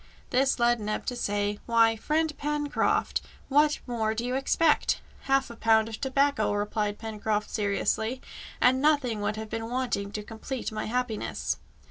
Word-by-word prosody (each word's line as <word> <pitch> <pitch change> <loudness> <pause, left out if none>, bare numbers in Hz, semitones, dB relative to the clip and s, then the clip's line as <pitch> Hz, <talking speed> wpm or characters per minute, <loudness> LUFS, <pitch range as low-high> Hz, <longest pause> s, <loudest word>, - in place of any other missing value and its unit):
This 265 +2 +3
led 240 -1 +3
Neb 215 0 -3
to 250 - -2
say, 205 -2 -1
"Why, 230 -1 +4
friend 305 +6 0
Pencroft, 295 0 0 0.3
what 295 +2 +4
more 220 -3 -1
do 230 +2 -2
you 250 - -1
expect?" 295 +4 +2 0.3
"Half 270 -2 +2
a - - -9
pound 225 -1 +3
of 220 - -7
tobacco," 275 -5 +2
replied 205 0 -1
Pencroft 215 -1 -2
seriously, 220 +3 0 0.4
"and 260 +1 +4
nothing 280 -8 +2
would 205 +1 -1
have 220 0 -6
been 225 0 -3
wanting 240 -5 -1
to 210 - -4
complete 225 +4 -5
my 215 - -3
happiness." 245 -1 -2
230 Hz, 155 wpm, -28 LUFS, 215-265 Hz, 0.4 s, Why